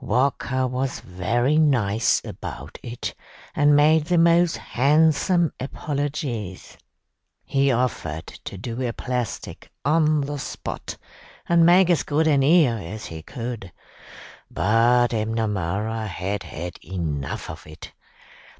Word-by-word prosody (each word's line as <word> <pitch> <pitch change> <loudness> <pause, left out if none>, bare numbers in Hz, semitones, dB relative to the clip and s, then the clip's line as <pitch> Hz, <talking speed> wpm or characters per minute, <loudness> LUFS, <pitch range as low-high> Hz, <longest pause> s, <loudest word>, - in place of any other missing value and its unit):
Walker 130 0 +1
was 130 +1 -2
very 120 - 0
nice 115 -7 +2
about - - -8
it, 120 0 -5 0.4
and 145 0 +5
made 150 +1 +5
the 175 +1 +1
most 170 0 +4
handsome 160 +5 +2
apologies. 135 - -4 0.7
He 135 0 +2
offered 110 -11 -1
to - - -9
do 115 +5 -5
a 120 -2 -1
plastic 125 -1 -4 0.2
on 155 0 +3
the 145 +1 -4
spot, - - -6 0.5
and 170 -1 +5
make 180 +1 +6
as 170 - +3
good 155 +2 +1
an 145 -3 +4
ear 140 -5 +4
as 105 +5 -7
he 80 -1 -7
could, 115 - -6 0.8
but 120 +4 +3
M'Namara 110 -1 -1
had 95 +2 -3
had 85 +2 -7
enough 80 -6 -4
of - - -9
it. 75 - -11
125 Hz, 120 wpm, -23 LUFS, 105-150 Hz, 0.8 s, make